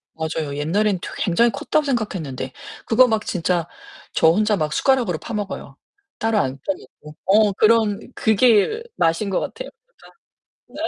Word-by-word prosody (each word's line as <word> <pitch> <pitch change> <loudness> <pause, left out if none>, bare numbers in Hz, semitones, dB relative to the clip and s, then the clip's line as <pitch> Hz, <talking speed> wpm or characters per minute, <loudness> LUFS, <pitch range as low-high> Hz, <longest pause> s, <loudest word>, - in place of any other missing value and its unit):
맞아요. 160 -2 -3
옛날에는 190 +6 0
되 - - -6
굉장히 220 +6 +2
컸다고 300 +8 -1
생각했는데 170 - -3 0.3
그거 250 +3 +5
막 220 -1 0
진짜 175 -1 -1 0.5
저 160 - +4
혼자 210 +4 +3
막 155 -3 -2
숟가락으로 245 - +1
파 235 - -8
먹어요. 205 -2 -5 0.4
따로 225 -1 +1
안 135 -7 -1
떠내고 150 -5 -7
어 210 +1 +4
그런 215 0 +3 0.2
그게 225 - +3
맛인 165 +5 +1
것 190 - 0
같아요. - - -6 1.0
혼자 290 +5 -10
205 Hz, 310 characters per minute, -21 LUFS, 165-225 Hz, 1.0 s, 그거